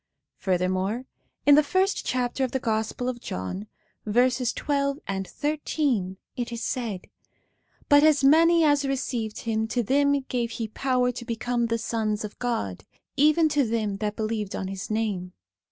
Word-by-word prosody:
Furthermore, 185 Hz, +5 st, 0 dB, 0.4 s
in 290 Hz, -, +8 dB
the 300 Hz, -, +8 dB
first 375 Hz, +6 st, +1 dB
chapter 250 Hz, +1 st, -1 dB
of 260 Hz, -, +1 dB
the 265 Hz, -, +1 dB
Gospel 225 Hz, +1 st, -1 dB
of 245 Hz, -2 st, -3 dB
John, 140 Hz, -, -5 dB, 0.4 s
verses 245 Hz, +3 st, +2 dB
12 280 Hz, -1 st, -1 dB
and 190 Hz, -1 st, -3 dB
13, 285 Hz, -9 st, -1 dB, 0.2 s
it 245 Hz, -1 st, -3 dB
is 235 Hz, -1 st, -4 dB
said: 225 Hz, -7 st, -2 dB, 0.9 s
'But 290 Hz, -1 st, +7 dB
as 300 Hz, -2 st, +4 dB
many 330 Hz, +4 st, +6 dB
as 290 Hz, -2 st, +4 dB
received 250 Hz, -5 st, -2 dB
him, 220 Hz, -1 st, -1 dB
to 240 Hz, +2 st, 0 dB
them 280 Hz, +4 st, +3 dB
gave 245 Hz, -3 st, -2 dB
he 225 Hz, -1 st, -4 dB
power 250 Hz, +1 st, +1 dB
to 245 Hz, 0 st, -7 dB
become 235 Hz, 0 st, -1 dB
the 230 Hz, 0 st, 0 dB
sons 220 Hz, -2 st, -1 dB
of 210 Hz, -, -10 dB
God, 100 Hz, -, -2 dB, 0.3 s
even 305 Hz, +3 st, +4 dB
to 295 Hz, -2 st, +2 dB
them 220 Hz, -4 st, -1 dB
that 210 Hz, +1 st, -2 dB
believed 215 Hz, -2 st, -2 dB
on 190 Hz, -, -3 dB
his 195 Hz, +1 st, -6 dB
name. 205 Hz, -5 st, -2 dB
240 Hz, 160 wpm, -26 LUFS, 215-275 Hz, 0.9 s, in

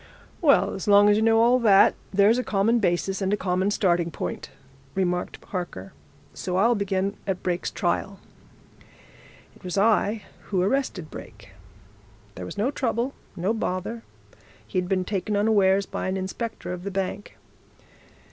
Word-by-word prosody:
"Well, 290 Hz, -5 st, +4 dB
as 190 Hz, -, -6 dB
long 205 Hz, 0 st, +6 dB
as 205 Hz, -, +5 dB
you -, -, +1 dB
know 225 Hz, 0 st, +4 dB
all 240 Hz, +2 st, +5 dB
that, 205 Hz, -5 st, +6 dB, 0.2 s
there's 205 Hz, +5 st, +4 dB
a -, -, -1 dB
common 225 Hz, +3 st, +2 dB
basis 190 Hz, 0 st, 0 dB
and 190 Hz, 0 st, 0 dB
a 210 Hz, -, +2 dB
common 185 Hz, 0 st, 0 dB
starting 175 Hz, -4 st, +1 dB
point," -, -, -5 dB, 0.5 s
remarked 180 Hz, -2 st, -1 dB
Harker, 175 Hz, -, -5 dB, 0.4 s
"so 180 Hz, -, -4 dB
I'll 230 Hz, +5 st, +4 dB
begin 200 Hz, -1 st, -1 dB
at 190 Hz, -2 st, -2 dB
Brake's 180 Hz, -1 st, -1 dB
trial. -, -, -2 dB, 1.4 s
It -, -, -21 dB
was 180 Hz, +1 st, -4 dB
I 210 Hz, +1 st, +2 dB, 0.2 s
who 190 Hz, -, -1 dB
arrested 200 Hz, -, -1 dB
Brake. -, -, -11 dB, 0.8 s
There 90 Hz, -2 st, -7 dB
was -, -, -8 dB
no 225 Hz, +7 st, +1 dB
trouble, 250 Hz, -1 st, -1 dB, 0.2 s
no 185 Hz, +6 st, 0 dB
bother. 215 Hz, +1 st, -3 dB, 0.6 s
He'd 180 Hz, -, -2 dB
been 185 Hz, -2 st, 0 dB
taken 205 Hz, +1 st, -2 dB
unawares, 200 Hz, -2 st, +3 dB
by -, -, -4 dB
an 190 Hz, +1 st, -1 dB
inspector 190 Hz, +1 st, -4 dB
of 180 Hz, 0 st, -7 dB
the 200 Hz, -, -3 dB
bank. 195 Hz, +1 st, -4 dB
195 Hz, 155 wpm, -25 LUFS, 185-220 Hz, 1.4 s, long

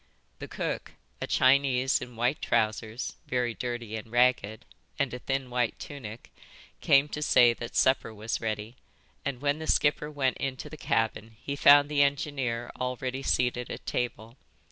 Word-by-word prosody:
The -, -, -7 dB
cook, -, -, -4 dB, 0.3 s
a -, -, -2 dB
Chinese 130 Hz, -1 st, +3 dB
in 125 Hz, -1 st, -8 dB
white 125 Hz, +5 st, 0 dB
trousers, 110 Hz, +2 st, -1 dB
very 125 Hz, -2 st, 0 dB
dirty 120 Hz, -2 st, -4 dB
and 110 Hz, 0 st, -7 dB
ragged, 120 Hz, -3 st, +2 dB, 0.3 s
and 140 Hz, -3 st, -1 dB
a 125 Hz, -, -5 dB
thin 135 Hz, -1 st, -3 dB
white 120 Hz, -2 st, 0 dB
tunic, 120 Hz, -5 st, -9 dB, 0.5 s
came 140 Hz, +1 st, +4 dB
to 150 Hz, -, -5 dB
say 120 Hz, -5 st, +5 dB
that 120 Hz, 0 st, -8 dB
supper 130 Hz, -3 st, +3 dB
was 110 Hz, +1 st, -4 dB
ready, 110 Hz, +2 st, -4 dB, 0.5 s
and 135 Hz, -2 st, -4 dB
when 145 Hz, +1 st, 0 dB
the 160 Hz, -, -6 dB
skipper 150 Hz, 0 st, +2 dB
went 140 Hz, -3 st, 0 dB
into 135 Hz, -1 st, -4 dB
the -, -, -7 dB
cabin 115 Hz, -4 st, -1 dB
he 140 Hz, -, -4 dB
found 145 Hz, 0 st, +7 dB
the 145 Hz, -1 st, +1 dB
engineer 135 Hz, -4 st, 0 dB
already 125 Hz, +1 st, -3 dB
seated 125 Hz, -2 st, 0 dB
at -, -, -7 dB
table. 120 Hz, 0 st, -3 dB
125 Hz, 160 wpm, -28 LUFS, 115-140 Hz, 0.5 s, found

